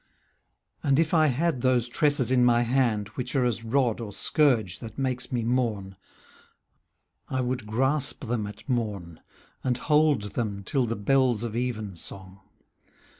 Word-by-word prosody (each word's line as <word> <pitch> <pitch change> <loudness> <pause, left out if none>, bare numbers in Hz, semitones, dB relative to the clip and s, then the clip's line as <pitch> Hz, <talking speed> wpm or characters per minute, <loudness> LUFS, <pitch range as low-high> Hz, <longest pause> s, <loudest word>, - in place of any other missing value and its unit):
And 135 -1 +2
if 160 +1 +1
I 155 -2 +5
had 145 0 0
those 125 -2 +2
tresses 140 0 +2
in 125 -1 +4
my 120 -1 +4
hand,. 115 -5 +1
Which 125 +5 -5
are 130 -2 +3
as 115 -2 -1
rod 120 -1 +1
or 110 -3 -6
scourge 120 - +1
that 115 -2 -9
makes 130 -2 -2
me 120 -2 -1
mourn, 110 -5 -1 1.3
I 130 - -1
would 125 -3 -3
grasp 135 +6 0
them 110 -2 -2
at 105 - -11
morn, 105 - -3 0.4
And 125 -2 0
hold 145 -7 +2
them 105 -4 -3
till 130 +4 0
the 115 - -2
bells 120 +1 +2
of 115 -2 -4
evensong. 100 -5 -4
120 Hz, 150 wpm, -26 LUFS, 110-130 Hz, 1.3 s, I